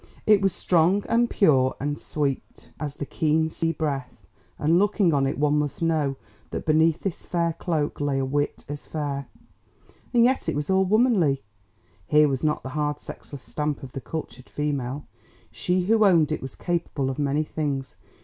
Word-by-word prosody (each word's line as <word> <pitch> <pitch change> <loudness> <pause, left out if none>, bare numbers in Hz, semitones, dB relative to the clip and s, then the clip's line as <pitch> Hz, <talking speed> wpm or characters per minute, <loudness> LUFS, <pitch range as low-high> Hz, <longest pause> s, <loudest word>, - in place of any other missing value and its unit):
It 210 -2 +5
was 195 -1 +3
strong 180 +4 +2
and 235 +1 +2
pure 135 - +3
and 145 +2 -2
sweet 140 -3 -3
as 145 -2 -4
the 145 - -4
keen 160 +2 +1
sea 165 +1 0
breath, 140 - -4 0.3
and 165 +4 +3
looking 200 -4 +3
on 135 -1 +2
it 135 - -2
one 150 0 +2
must 150 +2 -2
know 155 -4 +1 0.3
that - - -5
beneath 160 +1 +3
this 195 -4 -4
fair 170 -1 0
cloak 155 -4 -2
lay 145 -1 0
a 135 - 0
wit 145 +2 -2
as 145 0 -7
fair. 145 -3 -3 0.8
And 240 -2 +5
yet 260 +2 +2
it - - -1
was 150 +5 -2
all 190 0 +4
womanly; 195 - +3 0.6
here 150 0 +5
was 135 -1 -2
not 150 -1 0
the 130 - -5
hard 150 +1 -1
sexless 140 -3 -10
stamp 150 -1 -3
of 130 - -8
the 135 - -6
"cultured" 145 -3 -7
female. 145 -2 -3 0.5
She 180 +1 0
who 215 +4 +3
owned 170 -6 +4
it 155 - -2
was 135 - -7
capable 165 -6 -2
of 130 - -6
many 145 +1 +1
things. 145 -3 -3
150 Hz, 180 wpm, -25 LUFS, 140-170 Hz, 0.8 s, It